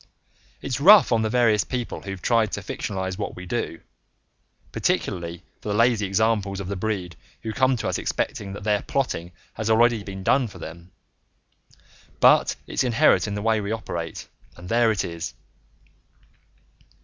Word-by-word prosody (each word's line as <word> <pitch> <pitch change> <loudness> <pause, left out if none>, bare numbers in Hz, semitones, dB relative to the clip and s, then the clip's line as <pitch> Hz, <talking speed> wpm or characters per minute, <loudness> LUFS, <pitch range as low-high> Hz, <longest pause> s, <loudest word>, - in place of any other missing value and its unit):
It's 130 -1 -2
rough 200 +1 +8
on 115 -2 +3
the 110 - 0
various 115 -3 +3
people 125 -2 -4
who've 95 -2 -7
tried 115 -3 +2
to 100 - -3
fictionalize 95 -1 -4
what - - -4
we 90 - -8
do 90 -4 -3 0.9
particularly 85 -1 -2 0.2
for - - -6
the 100 - 0
lazy 115 -2 +3
examples 100 -1 +1
of 95 - -5
the 100 - -2
breed, 95 -4 -3 0.3
who 110 -1 -3
come 130 +1 +2
to - - -3
us - - -1
expecting 100 -1 -3
that 100 - -8
their 105 -1 +1
plotting 90 -11 -2 0.2
has 110 0 -3
already 115 0 +4
been 95 -1 -7
done 130 +4 +3
for 100 - -12
them 85 +2 -10 1.3
but - - +5
it's - - -1
inherent 120 -3 +3
in 100 - -3
the 105 - -4
way 110 -1 +2
we 100 +1 -4
operate, 85 -7 -5 0.3
and 90 +1 -10
there 115 0 +3
it 105 - -1
is. 85 0 -6
105 Hz, 165 wpm, -24 LUFS, 95-115 Hz, 1.3 s, rough